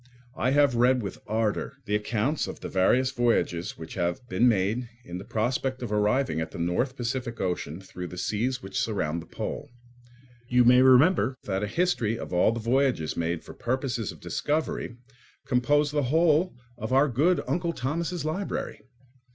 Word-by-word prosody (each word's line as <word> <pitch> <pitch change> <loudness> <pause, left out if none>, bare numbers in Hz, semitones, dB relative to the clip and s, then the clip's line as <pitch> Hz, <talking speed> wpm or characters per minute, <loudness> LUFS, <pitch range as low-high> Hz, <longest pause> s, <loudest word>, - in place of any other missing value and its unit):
I 130 - +1
have 140 -1 +4
read 125 +1 +3
with 100 - -6
ardour 110 -1 -1
the 105 - -3
accounts 110 +7 0
of - - -8
the - - -4
various 125 +8 +3
voyages 105 -6 0
which 80 0 -8
have 90 +6 -2
been 125 0 +3
made 110 +4 0 0.2
in 90 +1 -6
the - - -7
prospect 125 +4 -1
of 115 - -4
arriving 105 - +1
at 80 - -3
the - - -9
North 90 +11 0
Pacific 120 -1 -3
Ocean 90 -3 -2
through 90 -2 -8
the 90 - -9
seas 120 +7 -1
which 95 0 -3
surround 85 -7 -1
the 85 - -13
pole. - - -5 0.8
You 125 0 +4
may 125 +1 +7
remember 130 +2 +5
that 95 -1 -2
a 105 - -1
history 115 - 0
of 115 - -7
all 90 +5 +4
the 115 - -3
voyages 120 - +1
made 85 0 -2
for - - -10
purposes 120 -4 -2
of - - -13
discovery 150 -5 -2 0.5
composed 145 +4 +2
the 145 - +2
whole 165 +2 +3 0.2
of 110 +3 -4
our 135 +3 +5
good 145 +6 +2
Uncle 170 0 0
Thomas' 165 +4 -3
library. 185 +6 -3
120 Hz, 175 wpm, -27 LUFS, 100-135 Hz, 0.8 s, may